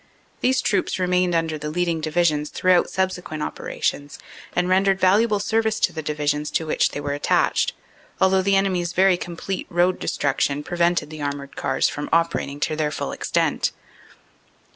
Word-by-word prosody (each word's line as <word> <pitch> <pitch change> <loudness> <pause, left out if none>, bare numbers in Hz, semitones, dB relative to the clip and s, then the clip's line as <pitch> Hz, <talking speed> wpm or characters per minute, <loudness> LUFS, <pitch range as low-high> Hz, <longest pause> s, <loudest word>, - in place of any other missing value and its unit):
These 260 +1 +2
troops 200 -3 0
remained 180 -1 +1
under 160 -2 -1
the 150 0 -4
leading 170 0 -1
Divi 155 +3 +1
sions 150 -3 +1
throughout 185 -1 +2
subsequent 180 -5 -2
operations 145 0 -3 0.4
and 180 0 +1
rendered 190 +1 +3
valuable 210 +3 +3
service 220 +1 0
to 175 - +2
the 160 - -4
Divisions 150 0 -1
to 160 - -1
which 155 - +1
they - - -6
were 145 0 -3
attached, 145 - +1 0.5
although 190 0 +4
the 195 +1 +2
enemy 195 -2 +2
s 175 0 -4
very 190 0 +4
complete 175 +2 -5
road 175 +1 +2
destruction 145 0 -1
prevented 175 -1 0
the 155 -1 -8
armored 140 -1 -4
cars 135 - +1
from 145 - -5
operating 165 -4 0
to 155 - 0
their 155 -1 0
full - - -4
extent. - - 0
175 Hz, 165 wpm, -23 LUFS, 150-185 Hz, 0.5 s, although